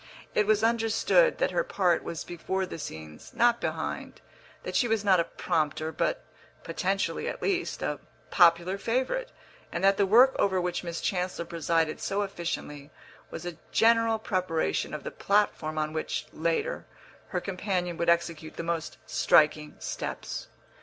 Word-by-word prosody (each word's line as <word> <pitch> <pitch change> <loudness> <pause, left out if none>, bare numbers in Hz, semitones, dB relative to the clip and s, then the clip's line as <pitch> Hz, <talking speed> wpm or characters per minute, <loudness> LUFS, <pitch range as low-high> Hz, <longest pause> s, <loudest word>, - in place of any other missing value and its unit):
It 210 - +2
was 215 0 +3
understood 230 - +3
that - - +1
her - - +1
part 180 - +1
was 165 - -5
before 190 +2 -3
the 175 - -7
scenes, 80 - -9
not 235 0 +3
behind; - - -4 0.4
that - - -5
she 245 - +3
was 220 -2 0
not 190 -3 +5
a - - +4
prompter, 155 -2 -1
but - - -1 0.4
(potentially, 190 +4 -1
at - - -5
least) 370 -2 -1
a - - -2 0.3
"popular 175 +2 +4
favourite," 260 - -1 0.4
and - - -3
that 195 0 +5
the 200 - +3
work 245 +6 +6
over 190 -2 +2
which 180 0 -2
Miss 170 -1 -4
Chancellor 180 -2 -2
presided 165 -1 0
so 200 +1 0
efficiently 170 -6 -5 0.4
was 170 - -7
a 175 -3 -5
general 230 0 +4
preparation 185 -8 -1
of 150 - -7
the - - -5
platform 200 -6 0
on 155 0 -1
which, 155 - -2
later, 170 - -1 0.4
her 180 - -2
companion 180 -2 -2
would 170 - +1
execute 165 -2 0
the - - -4
most 165 -1 -3
striking 150 -1 +3
steps. - - -5
180 Hz, 155 wpm, -28 LUFS, 165-210 Hz, 0.4 s, work